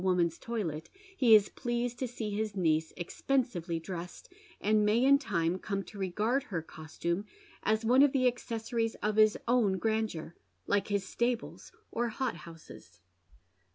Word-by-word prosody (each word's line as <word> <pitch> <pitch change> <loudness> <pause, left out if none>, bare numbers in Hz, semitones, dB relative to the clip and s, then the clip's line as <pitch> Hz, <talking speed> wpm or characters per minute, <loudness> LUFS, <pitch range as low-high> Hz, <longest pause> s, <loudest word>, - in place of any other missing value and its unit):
67 185 -1 +2
Woman's 170 -2 +1
toDet 170 -10 -4 0.3
he 235 - +7
is 205 -2 +4
pleased 240 -1 -3
to 260 - 0
fsee 220 -3 -4
his 215 -1 -2
niece 160 -3 +1
expensively 180 -4 -1
dressed, 175 +1 -8 0.3
and 215 +1 +3
may 215 +4 +3
in 280 +1 +6
time 170 - -1
come 200 0 -3
to 205 - -11
rej^ard 210 +8 0
her 170 - -4
costume 170 +5 -4 0.3
as 220 +1 +1
one 250 +4 +5
of 285 -1 +6
the 265 -2 +1
acces 235 -2 -2
Boriea 225 -1 0
of 210 0 0
his 215 -1 +5
own 230 -6 +3
grandeur, 220 -6 -1 0.3
like 200 -1 +1
his 200 -2 -1
stables 235 0 -2 0.2
or 235 +1 -1
hothouses. 165 - -7
210 Hz, 155 wpm, -31 LUFS, 175-235 Hz, 0.3 s, he